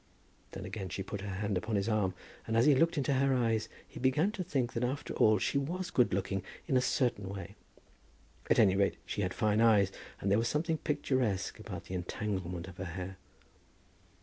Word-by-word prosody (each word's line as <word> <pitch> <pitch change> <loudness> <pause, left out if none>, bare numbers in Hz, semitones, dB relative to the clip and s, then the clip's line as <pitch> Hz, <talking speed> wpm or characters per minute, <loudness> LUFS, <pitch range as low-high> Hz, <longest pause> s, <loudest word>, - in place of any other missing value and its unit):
Then - - -6
again 95 -3 -5
she 95 - -3
put 100 +1 -5
her 100 - -5
hand 100 0 -1
upon 105 +3 -3
his 100 +1 0
arm, 105 -5 +1 0.3
and 115 0 +1
as 115 - +5
he 150 - +7
looked 165 +5 +3
into 140 0 +1
her 135 0 +3
eyes 115 -3 +1 0.2
he - - -10
began 140 +10 +2
to 205 -4 -4
think 135 -9 -1
that 115 - -1
after 135 +4 -2
all 110 0 +5
she 140 - +1
was 180 +6 -3
good 125 - +3
looking 95 +1 -1 0.2
in 135 - 0
a 125 - +5
certain 120 -7 0
way. 100 -1 -6 1.0
At - - +4
any 100 -4 +5
rate 100 0 +2
she - - -3
had 90 -2 0
fine 105 +2 +2
eyes, 105 -4 +5 0.3
and 100 - -1
there 100 - +5
was 115 - +1
something 160 +3 0
picturesque 130 - 0
about - - -7
the - - -8
entanglement 90 -1 -3
of 95 -1 -11
her 95 - -4
hair. 90 +2 -6
110 Hz, 205 wpm, -32 LUFS, 95-130 Hz, 1.0 s, he